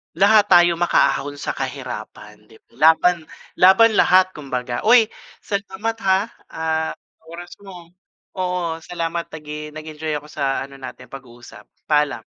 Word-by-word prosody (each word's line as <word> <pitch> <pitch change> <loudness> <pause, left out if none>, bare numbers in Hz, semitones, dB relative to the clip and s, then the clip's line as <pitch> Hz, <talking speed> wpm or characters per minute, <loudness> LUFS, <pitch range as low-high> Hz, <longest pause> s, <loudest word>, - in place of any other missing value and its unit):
Lahat 205 +3 +5
tayo 175 -3 +5
makaahon 145 -4 +1
sa - - -4
kahirapan 105 0 -7
dib 110 0 -20
laban 160 +5 +3 0.3
laban 200 +4 +6
lahat 185 0 +5
kumbaga 130 -3 -5
uy 230 -1 +6 0.3
salamat 205 +2 -4
ha, 190 0 +4 0.3
ah, 160 0 -2
sa - - -29
oras 175 +1 -9
mo 175 -3 -12 0.5
oo 180 -3 -2
salamat 170 0 -4
nag-e 150 0 -8
nag-enjoy 155 0 -6
ako 150 0 -5
sa 140 -3 -2
ano 135 0 -9
natin 130 -1 -10
pag-uusap 120 -3 -13 0.2
paalam. 150 -1 +1
160 Hz, 130 wpm, -20 LUFS, 145-185 Hz, 0.5 s, laban